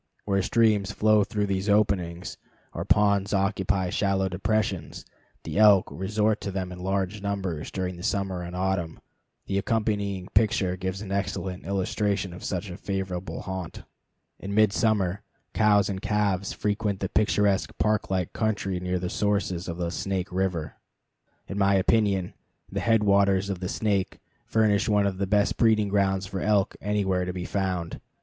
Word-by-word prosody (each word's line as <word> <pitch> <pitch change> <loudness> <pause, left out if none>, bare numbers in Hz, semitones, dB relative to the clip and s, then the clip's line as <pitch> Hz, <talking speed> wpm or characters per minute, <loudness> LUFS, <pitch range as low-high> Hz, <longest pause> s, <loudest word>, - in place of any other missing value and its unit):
Where 100 -1 +1
streams 105 -1 +2
flow 110 0 +4
through 105 0 -1
these 100 +1 -1
openings, 95 -4 +1 0.4
or - - -3
ponds 100 -1 +3
occupy 95 -2 0
shallow 100 -1 +1
depressions, 95 -4 -2 0.4
the - - -3
elk 105 -3 +6
resort 105 +3 0
to - - -3
them 95 -1 -3
in 90 - -8
large 95 +2 -2
numbers 95 -6 -3
during 90 -2 -4
summer 95 -1 -1
and 90 0 -6
autumn. 90 -3 -1 0.5
The 100 0 0
accompanying 100 -3 -1
picture 100 -3 +2
gives 95 +2 -4
an 95 - -7
excellent 95 -2 -3
illustration 100 -1 -1
of 90 - -10
such 90 0 -3
a 90 - -7
favorite 95 -3 -3 0.2
haunt. 95 -3 -6 0.6
In 100 +1 -5
midsummer 105 -3 +2 0.3
cows 105 -2 +4
and 95 -1 -4
calves 100 -2 0
frequent 105 -1 -1
the 95 - -1
picturesque 105 -1 +1
park 110 0 +1
like 95 -2 -1
country 100 -4 -1
near 90 0 -1
the 90 0 -3
sources 100 -3 -1
of 85 -1 -4
the 85 -1 -2
Snake 95 -1 -3
River. 90 -4 -2 0.7
In 100 - -4
my 100 0 +4
opinion, 95 -2 +2 0.4
the - - -2
head 115 -2 +3
waters 100 -1 +3
of 95 - -4
the 90 -1 -4
Snake 100 -4 -1 0.3
furnish 110 -2 +2
one 105 -1 +3
of 95 -1 -2
the 100 - 0
best 105 +1 +2
breeding 110 -3 +3
grounds 95 -1 +1
for 95 -1 -5
elk 100 -1 +2
anywhere 100 -3 0
to 90 0 -3
be 90 -1 -4
found. 90 -4 -2
100 Hz, 160 wpm, -26 LUFS, 95-105 Hz, 0.7 s, elk